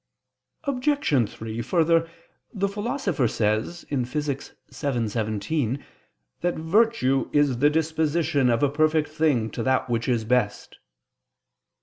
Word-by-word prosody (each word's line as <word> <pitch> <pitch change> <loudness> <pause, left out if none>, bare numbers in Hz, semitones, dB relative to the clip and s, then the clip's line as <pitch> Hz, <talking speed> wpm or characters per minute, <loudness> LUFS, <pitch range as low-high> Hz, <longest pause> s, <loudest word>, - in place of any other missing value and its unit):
Obj. 255 - +1
3: 110 +1 -6
Further, 165 +4 +2 0.4
the 200 -3 -1
Philosopher 200 - -1
says 110 +11 -1
(Phys. 140 +2 -1
vii, 145 - +1
text. 135 - -12 0.2
17) 115 +1 -2 0.6
that 175 0 0
virtue 160 - +2
"is 145 -4 +2
the 145 +2 +5
disposition 160 -2 +1
of 115 +1 +2
a 145 - +4
perfect 155 +1 +2
thing 150 -8 +1
to - - -4
that 130 0 +1
which 115 +1 0
is 115 -3 +1
best." 115 -3 -1
145 Hz, 120 wpm, -25 LUFS, 120-165 Hz, 0.6 s, the